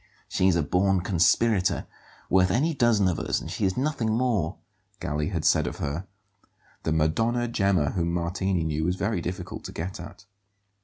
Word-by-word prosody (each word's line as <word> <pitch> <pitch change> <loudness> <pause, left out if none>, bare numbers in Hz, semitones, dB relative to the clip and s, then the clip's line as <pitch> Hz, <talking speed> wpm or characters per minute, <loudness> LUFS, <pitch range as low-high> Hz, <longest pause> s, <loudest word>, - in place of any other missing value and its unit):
"She's 95 -1 +2
a 85 - +2
born 95 +3 +2
conspirator, 95 +2 +2 0.4
worth 95 0 +4
any 145 - +1
dozen 120 -7 +3
of 90 - 0
us; - - -1
and - - -7
she - - -1
is 95 -1 0
nothing 130 -5 0
more," 110 -8 0 0.4
Galli 75 +1 -2
had - - -3
said - - +3
of - - -5
her. 75 +7 -3 0.7
The 80 - -2
"Madonna 115 +11 +1
Gemma" 100 -10 +1
whom 85 -2 -1
Martini 90 +1 -1
knew 80 0 -1
was 90 +2 +1
very 100 -1 -1
difficult 90 +2 -5
to - - -6
get 90 +3 -5
at. 90 +3 -11
95 Hz, 170 wpm, -26 LUFS, 85-110 Hz, 0.7 s, worth